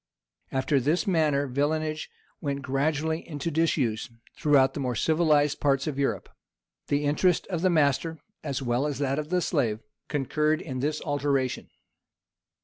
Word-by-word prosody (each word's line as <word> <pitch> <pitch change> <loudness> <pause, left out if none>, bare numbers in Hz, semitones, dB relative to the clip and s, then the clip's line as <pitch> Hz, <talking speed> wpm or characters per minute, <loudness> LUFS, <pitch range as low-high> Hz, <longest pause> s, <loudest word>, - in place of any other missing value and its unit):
After 135 +1 +1
this 155 +6 +1
manner 155 -6 +2
villenage 155 +3 -1 0.3
went 140 -2 -3
gradually 150 +4 0
into 150 +1 -3
disuse 140 -8 0 0.3
throughout 145 -4 +4
the - - -5
more 125 -3 -1
civilized 155 -1 +2
parts 135 -1 +2
of 145 -3 -3
Europe: 140 - -1 0.6
the 145 +1 +1
interest 160 +5 +2
of 170 -3 -1
the 185 - +3
master, 160 0 +2 0.3
as 140 -3 -3
well 125 +3 +1
as 145 - -3
that 140 0 0
of 150 0 -5
the 180 0 +1
slave, 120 -11 0 0.3
concurred 150 +2 0
in 130 -4 -5
this 150 +3 -1
alteration. 140 -3 -1
145 Hz, 145 wpm, -27 LUFS, 135-155 Hz, 0.6 s, throughout